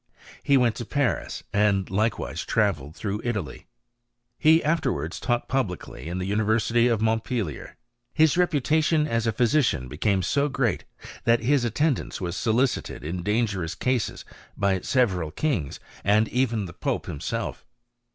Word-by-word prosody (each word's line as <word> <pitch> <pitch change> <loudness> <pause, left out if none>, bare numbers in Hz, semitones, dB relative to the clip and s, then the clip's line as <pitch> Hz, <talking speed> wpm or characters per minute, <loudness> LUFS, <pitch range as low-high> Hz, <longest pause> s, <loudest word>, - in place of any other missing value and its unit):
He 140 - +4
went 120 -3 +3
to 120 - -4
Paris, 140 +1 -1
and 100 -2 +2
likewise 110 +4 -1
travelled 85 -9 0
through 105 0 -3
Italy. 115 -5 -4 0.7
He 160 +1 +5
afterwards 145 - -1
taught 120 -1 -1
publicly 105 -12 -3
in 85 +2 -3
the 90 - -2
University 110 +4 +2
of 115 -3 +1
Mont 110 0 +1
pelier. 105 - -4 0.4
His 160 -2 +4
reputation 155 -2 +2
as 115 -3 0
a - - +3
physician 120 - +1
became 95 +8 0
so 140 +7 +1
great, 125 -4 -1 0.4
that 115 0 +4
his 135 +2 +2
attendance 135 +5 0
was 90 -1 -3
solicited 120 +5 0
in 85 +4 -3
dangerous 100 -4 -1
cases 125 -4 -1 0.3
by 100 -2 +1
several 95 - +1
kings, 105 - -2 0.2
and 105 +3 +3
even 120 -3 +1
by 85 - -8
the - - -22
pope - - -1
himself. 70 - -4
115 Hz, 145 wpm, -25 LUFS, 95-130 Hz, 0.7 s, He